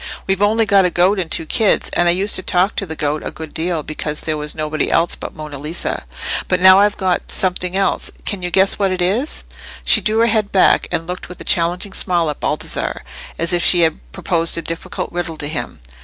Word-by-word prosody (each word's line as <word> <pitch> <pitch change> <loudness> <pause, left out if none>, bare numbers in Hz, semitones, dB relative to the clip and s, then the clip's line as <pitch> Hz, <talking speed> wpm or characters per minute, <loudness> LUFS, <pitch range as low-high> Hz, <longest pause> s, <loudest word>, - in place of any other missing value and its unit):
We've 195 0 0
only 220 +2 +3
got 200 -2 +4
a 180 - +2
goat 185 +4 +2
and 175 -3 -3
two 165 - 0
kids, 210 +6 +2
and 175 - +2
I - - +5
used 195 +4 +1
to - - +3
talk 185 +2 +1
to 195 - -2
the 160 - -6
goat 150 0 -2
a - - -4
good 160 -2 -9
deal, 165 -1 -1
because 150 0 -4
there 155 - -2
was 150 0 -4
nobody 155 0 -2
else 170 - +2
but - - -7
Monna 150 -3 -8
Lisa. 155 +4 -4 0.4
But 185 - +1
now 185 +1 +8
I've 205 +1 +2
got 185 -2 -1
something 180 -1 -1
else—can 195 0 -2
you 180 - -3
guess 190 +3 +2
what 195 -2 +1
it 185 - -2
is?" 205 - -1 0.4
She - - +5
drew 215 0 0
her - - +5
head 215 -3 0
back, 190 - +4
and 165 - -2
looked 180 +1 -7
with 180 - -10
a - - -8
challenging 175 +3 +1
smile 170 -4 0
at 145 - -10
Baldassarre, - - -1 0.3
as 170 +2 -1
if 175 - +1
she 175 - +5
had 160 -1 +1
proposed 165 - +1
a 165 - -3
difficult 165 0 -5
riddle 175 -2 -4
to 145 - -5
him. 155 - -5
180 Hz, 230 wpm, -18 LUFS, 160-195 Hz, 0.4 s, now